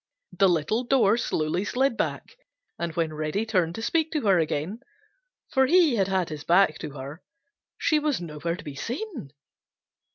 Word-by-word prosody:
The 190 +1 +3
little 175 +8 +1
door 235 -5 +3
slowly 175 -6 -1
slid 255 +3 +1
back, - - -3 0.4
and 170 -1 -2
when 165 -2 -1
Reddy 155 +8 -2
turned 185 -7 0
to 225 - -5
speak 320 +4 +1
to 305 - 0
her 195 -6 +4
again, 160 +6 -2 0.7
for 265 -1 +3
he 325 -5 +4
had 195 -2 +2
had 190 -3 0
his 150 -2 -6
back 175 -2 +3
to 145 - -6
her, 140 +5 -8 0.6
she 310 - +2
was 300 -3 0
nowhere 170 0 -4
to 175 - -11
be 145 -3 -7
seen. 250 - -5
190 Hz, 170 wpm, -26 LUFS, 160-245 Hz, 0.7 s, her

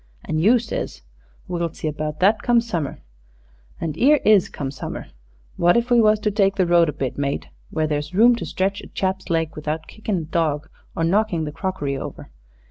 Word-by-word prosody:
an' 155 - -1
you 220 +9 +5
says, 220 - -5 0.4
'We'll 170 -2 -2
see - - -4
about 155 0 -3
that, 205 +3 +4
come 240 -1 +4
summer.' 175 - -3 0.8
And 160 -3 -3
'ere 295 +4 +6
is 210 -4 +5
come 135 -2 -4
summer. 140 - -6 0.5
What 175 +5 +4
if 235 +1 -1
we 240 -1 +6
was 215 -1 +4
to 210 - +1
take 195 -1 +2
the 185 - +2
road 170 -2 +4
a - - 0
bit, 135 -1 -4
mate 140 0 -2 0.2
where 155 -1 0
there's 150 0 -2
room 235 +4 +6
to - - -4
stretch 195 +2 -1
a - - -11
chap's 190 0 -2
legs 165 -2 0
without 155 +1 -3
kickin' 215 -2 -3
a - - -2
dog 155 -2 -1 0.3
or 165 - -1
knockin' 185 -1 +1
the 150 - -4
crockery 150 -4 -3
over? - - -8
170 Hz, 200 wpm, -22 LUFS, 155-210 Hz, 0.8 s, ere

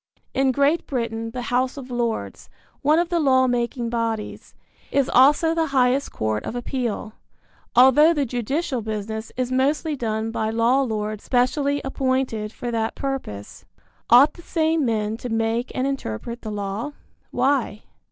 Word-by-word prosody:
In 270 0 +2
Great 280 +5 +1
Britain 230 -3 -3
the 250 +1 -5
House 250 +3 0
of 260 -2 -8
Lords 235 -2 -3 0.3
one 300 +2 +4
of 345 0 +1
the 345 -1 +1
law 260 -4 +4
making 240 -1 -1
bodies 230 -2 -3 0.4
is 280 -2 +2
also 295 +5 +5
the 325 -1 +1
highest 265 0 +2
court 110 -1 -2
of - - -5
appeal, 240 -3 -3 0.6
although 265 +6 +7
the 295 -4 0
judicial 255 +3 -2
business 220 +1 -5
is 255 0 -1
mostly 290 +4 +1
done 225 -3 -2
by 220 -1 -1
law 230 +4 +2
lords 215 -4 -3
specially 280 +3 +1
appointed 260 -5 -1
for 240 +1 -5
that 225 -1 -1
purpose. 265 - -5 0.5
Ought 265 +6 +7
the - - -13
same 320 -3 0
men 220 -2 -1
to 245 - -6
make 225 +2 -1
and 255 - 0
interpret 235 - -4
the 220 - -6
law? 205 +6 -4 0.4
Why? 260 -6 0
245 Hz, 150 wpm, -23 LUFS, 225-275 Hz, 0.6 s, although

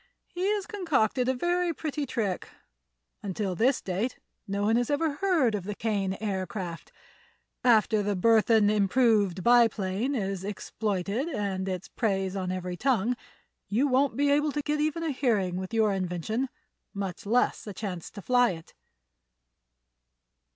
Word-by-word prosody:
He 370 +3 -1
has 410 -2 -2
concocted 275 - 0
a 260 - +1
very 350 +3 0
pretty 300 -2 -3
trick. 205 -7 -2 0.7
Until 195 -1 -2
this 245 +8 +2
date 200 +7 -2 0.3
no 200 +1 -1
one 220 +2 +3
has 240 0 +1
ever 290 0 0
heard 335 - +2
of 205 -3 -2
the 205 +2 -5
Kane 200 -4 -1
Aircraft. 190 -4 -4 0.7
After 220 -3 +4
the 205 0 -1
Burthon 220 +1 +4
Improved 205 -3 +2
Biplane 230 0 +3
is 195 -4 -2
exploited 205 - -2
and 195 - -2
its 185 -2 -4
praise 195 -4 -1
on 185 -2 -2
every 180 -1 -4
tongue, 245 0 +1 0.5
you 245 +8 +2
won't 270 +1 +2
be 285 0 +3
able 295 +1 +2
to 295 - -2
get 300 +1 -1
even 310 +2 0
a 320 - 0
hearing 215 -10 0
with 185 +2 -5
your 220 -3 +2
invention, 190 +7 -2 0.5
much 200 +1 -5
less 235 0 +1
a - - -4
chance 185 -5 -5
to 200 - -10
fly 245 -4 +3
it." 165 -1 -12
220 Hz, 150 wpm, -28 LUFS, 195-265 Hz, 0.7 s, After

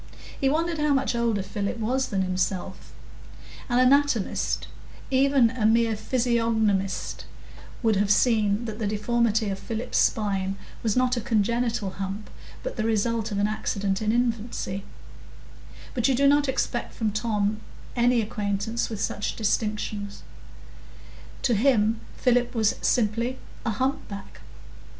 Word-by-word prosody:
He 270 - +3
wondered 325 +2 0
how 295 -1 +3
much 270 -1 +1
older 230 -4 0
Philip 200 +3 -3
was 255 +4 0
than 190 -2 0
himself. 185 0 -2 0.8
An 245 - +2
anatomist—even 265 0 +2
a 230 -4 +1
mere 225 0 +3
physiognomist—would 225 -2 -1
have 200 0 +1
seen 215 0 +3
that 220 -1 -5
the 215 - -1
deformity 220 0 +1
of 195 0 -3
Philip's 225 +2 -2
spine 195 -3 +1 0.2
was 220 -1 0
not 255 0 +2
a - - -1
congenital 230 -1 0
hump, 195 +2 -5 0.3
but - - -5
the 215 - 0
result 225 0 0
of 200 - -2
an 200 - +2
accident 200 -2 -1
in 215 0 +1
infancy; 230 -4 -1 1.1
but 240 -1 +1
you 265 - +3
do 280 +3 +2
not 290 0 +4
expect 255 -2 -2
from 220 -2 0
Tom 210 -1 0 0.4
any 240 0 +3
acquaintance 210 +2 -2
with 220 -3 -5
such 205 - -2
distinctions; 210 -1 -2 1.2
to 245 - +3
him, 220 -1 +3 0.2
Philip 245 0 +2
was 220 -2 +3
simply 235 +2 +1 0.3
a 230 - -1
humpback. 220 -4 -3
225 Hz, 130 wpm, -26 LUFS, 205-245 Hz, 1.2 s, not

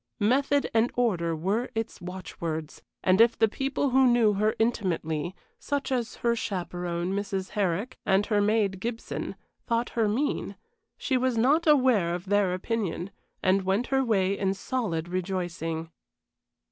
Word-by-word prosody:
Method 275 +6 +2
and 225 +2 +3
order 180 -9 +1
were 195 +10 -1
its 225 -3 -3
watchwords; 170 -4 -5 0.2
and 185 +3 +5
if 230 0 +5
the 225 - +4
people 270 +4 -1
who 265 +1 +5
knew 235 -3 +4
her 215 +2 +1
intimately 175 -7 -1 0.2
such 285 -2 -2
as 245 -3 -1
her 235 0 +4
chaperon, 180 -4 -3
Mrs. 195 -1 -2
Herrick, 200 +2 -1
and 195 +1 +3
her 210 -1 +2
maid, 205 -2 +1
Gibson 230 +3 -4 0.3
thought 235 +1 0
her 225 -2 +1
mean, 255 +8 -1 0.4
she 265 - 0
was 255 -2 0
not 295 +9 +3
aware 250 - +4
of 180 +1 -6
their 200 -2 +2
opinion, 190 -2 -3 0.3
and 190 +1 +3
went 195 +5 0
her 270 0 +3
way 200 -5 +2
in 195 -1 0
solid 195 -7 -2
rejoicing. 175 -3 -3
205 Hz, 145 wpm, -27 LUFS, 180-235 Hz, 0.4 s, and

